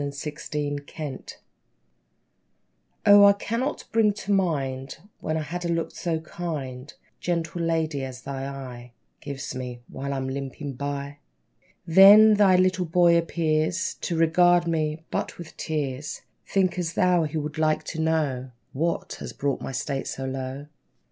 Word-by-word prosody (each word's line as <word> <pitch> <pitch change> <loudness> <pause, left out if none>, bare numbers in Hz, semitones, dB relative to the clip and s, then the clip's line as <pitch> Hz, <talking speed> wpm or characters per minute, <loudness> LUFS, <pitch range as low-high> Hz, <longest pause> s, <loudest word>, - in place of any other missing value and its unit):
=The 145 +1 -5
Lame 145 -1 -1 0.2
House= 145 -5 -6 1.7
O, 205 0 +9
I 200 0 +8
cannot 230 +7 -3
bring 220 -2 +3
to 205 0 -5
mind 135 -8 -1 0.2
When 155 0 -2
I've 155 - -3
had 175 +4 -5
a - - -1
look 165 -1 -1
so 165 -3 -2
kind, 150 -5 -6 0.3
Gentle 170 -1 -2
lady, 160 -4 0
as 130 -1 -7
thine 135 -1 -4
eye 125 -3 -8 0.3
Gives 140 -2 -6
me, 125 -1 -6
while 140 +1 -5
I'm 135 -1 -2
limping 135 +1 -5
by! 140 +2 -5 0.7
Then, 200 +5 +9
thy 205 -3 +5
little 185 0 +2
boy 170 +1 +4
appears 165 +1 0
To 170 - -2
regard 175 +2 +4
me 155 -1 -1
but - - -3
with 170 -2 -10
tears. 150 -2 -3 0.2
Think'st 180 -3 0
thou 180 -3 +3
he 155 +1 -3
would 150 +1 -4
like 155 -1 +2
to 160 - -4
know 150 -5 0 0.2
What 165 +5 -2
has - - -7
brought 140 -1 -2
my - - -5
state 135 +1 -3
so 135 - -4
low? 130 +1 -4
155 Hz, 150 wpm, -25 LUFS, 140-175 Hz, 1.7 s, O